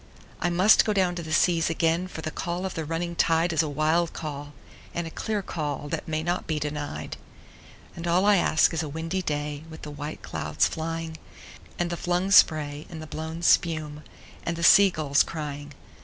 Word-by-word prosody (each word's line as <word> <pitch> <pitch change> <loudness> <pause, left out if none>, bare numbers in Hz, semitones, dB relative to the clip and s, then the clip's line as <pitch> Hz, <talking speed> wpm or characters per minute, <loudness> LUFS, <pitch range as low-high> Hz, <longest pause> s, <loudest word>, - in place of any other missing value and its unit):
I 175 - 0
must 185 +5 +5
down 210 - -1
go 185 -2 +2
to - - -3
the 160 -1 -7
seas 165 0 +3
again, 165 +2 +1
for 165 - -8
the 155 - -3
call 175 +3 -3
of 190 - -3
the 160 - -4
running 170 +2 -3
tide 165 +1 +2
Is 160 - +3
a 155 - -2
wild 155 +3 +1
call 145 -2 -6 0.4
and 170 - -2
a 165 - -7
clear 210 +1 -3
call 145 -4 -4
that - - -4
may 155 0 -2
not 175 +2 -2
be 155 - -1
denied; 150 0 -4 0.8
And 170 0 -5
all 180 +3 +3
I 205 -1 +5
ask 165 -1 +3
is 165 - 0
a 155 - -4
windy 165 +5 -3
day 150 -2 -3
with 160 0 -11
the 150 - -6
white 145 +1 -7
clouds - - 0
flying, 165 0 -4 0.6
And 175 0 -1
the 170 - -3
flung 180 +3 -1
spray 150 -5 +4
and 165 - -8
the 155 - -7
blown 160 +2 -6
spume, 155 -4 +2 0.4
and 170 - -2
the 170 - -5
sea 200 +3 +8
gulls 150 -5 +1
crying. 145 -2 -5
165 Hz, 200 wpm, -26 LUFS, 150-175 Hz, 0.8 s, sea